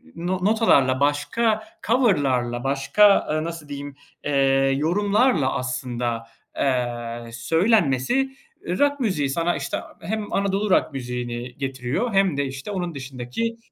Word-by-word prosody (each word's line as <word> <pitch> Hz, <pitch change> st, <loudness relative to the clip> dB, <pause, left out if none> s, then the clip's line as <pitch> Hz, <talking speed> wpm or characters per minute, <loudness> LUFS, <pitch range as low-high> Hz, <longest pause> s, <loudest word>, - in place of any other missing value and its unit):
no 180 Hz, +2 st, -2 dB
notalarla, 140 Hz, -, +4 dB
başka 215 Hz, +11 st, +1 dB, 0.2 s
cover'larla, 140 Hz, -, +2 dB
başka, 140 Hz, +10 st, +4 dB
eee, 155 Hz, 0 st, 0 dB
nasıl 165 Hz, -3 st, -6 dB
diyeyim, 145 Hz, 0 st, -6 dB, 0.3 s
eee, 145 Hz, -, -1 dB, 0.5 s
yorumlarla 200 Hz, -, +2 dB
aslında, 125 Hz, -2 st, -2 dB, 0.3 s
eee, 120 Hz, -3 st, -2 dB
söylenmesi, 160 Hz, -, +2 dB, 0.5 s
eee, 180 Hz, -, -2 dB
rock 285 Hz, 0 st, +2 dB
müziği 185 Hz, -, 0 dB
sana, 170 Hz, +5 st, 0 dB
işte, -, -, -3 dB, 0.2 s
hem 210 Hz, +4 st, -4 dB
Anadolu 200 Hz, +1 st, 0 dB
rock 155 Hz, -, +2 dB
müziğini 125 Hz, -1 st, -5 dB
getiriyor 135 Hz, -, -2 dB
hem 195 Hz, -6 st, +3 dB
de, 140 Hz, -, +1 dB
işte, 135 Hz, +8 st, -6 dB
onun 175 Hz, -4 st, -3 dB
dışındaki 135 Hz, -, -4 dB
145 Hz, 125 wpm, -23 LUFS, 130-200 Hz, 0.5 s, notalarla